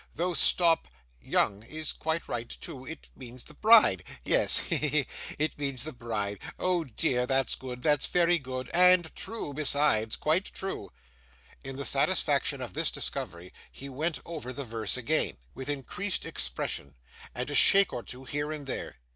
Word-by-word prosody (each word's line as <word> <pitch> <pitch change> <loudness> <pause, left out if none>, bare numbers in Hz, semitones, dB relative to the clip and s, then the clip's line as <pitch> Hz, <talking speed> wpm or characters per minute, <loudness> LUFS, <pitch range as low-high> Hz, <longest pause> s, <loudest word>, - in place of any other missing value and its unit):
Though 180 +1 -1
stop 170 -1 +4 0.3
young 100 0 +2
is 155 +7 -4
quite 160 +1 -2
right 120 -1 -4
too 135 -6 -9
it 160 - -9
means 125 -1 -8
the - - -14
bride 215 - +6 0.2
yes. - - +5
He, - - 0
he, 150 - 0
he! 145 -1 +1 0.3
It 155 0 -2
means 135 -4 -2
the 155 - -6
bride. 105 -5 -3 0.2
Oh 180 -2 0
dear, 125 0 -1
that's 135 0 +1
good. 125 -1 -7
That's 150 -2 +2
very 175 -1 +3
good. 130 -2 -6
And 180 -1 +5
true 220 -10 -4
besides, 140 -6 +2
quite 165 +6 +1
true!' 190 - -5 0.7
In 135 0 -6
the 140 +1 -4
satisfaction - - +1
of - - -8
this - - 0
discovery, 85 +2 -5 0.2
he 140 - -9
went 155 +5 -2
over 155 -7 -6
the 140 +2 -5
verse 115 0 -1
again, 120 - +1 0.2
with 130 - -6
increased 145 - -3
expression, 70 0 -4 0.4
and 125 +4 -3
a - - -3
shake 195 +7 +6
or - - -3
two 125 +2 -8
here 145 +3 -3
and 150 -2 -6
there. 135 - -5
140 Hz, 170 wpm, -29 LUFS, 125-160 Hz, 0.7 s, bride